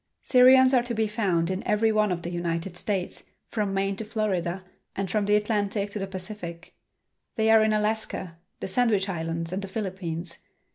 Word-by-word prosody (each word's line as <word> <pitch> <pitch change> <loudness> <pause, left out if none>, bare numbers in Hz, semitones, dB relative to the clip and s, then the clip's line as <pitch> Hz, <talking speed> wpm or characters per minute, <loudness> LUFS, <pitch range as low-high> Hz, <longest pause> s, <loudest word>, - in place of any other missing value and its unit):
Syrians 260 +1 +6
are 250 - +5
to 240 -1 -4
be 220 0 +1
found 190 -6 0
in 190 +1 -2
every 220 +1 +3
one 215 -2 +2
of 175 -1 -3
the 175 - -4
United 175 +1 -3
States, 185 0 -3 0.3
from 210 -3 -1
Maine 195 0 0
to 220 - -3
Florida, 195 -5 -2 0.3
and 195 -2 -3
from 210 -2 0
the 205 - +4
Atlantic 205 -1 0
to 210 - -4
the 195 - -3
Pacific. 185 -3 -8 0.6
They 220 0 +3
are 220 -1 +7
in 220 - +2
Alaska, 210 -5 -2 0.2
the - - -3
Sandwich 205 -1 +2
Islands 165 -1 -3
and 190 - -2
the 195 - -5
Philippines. 185 -4 -5
200 Hz, 185 wpm, -26 LUFS, 180-215 Hz, 0.6 s, are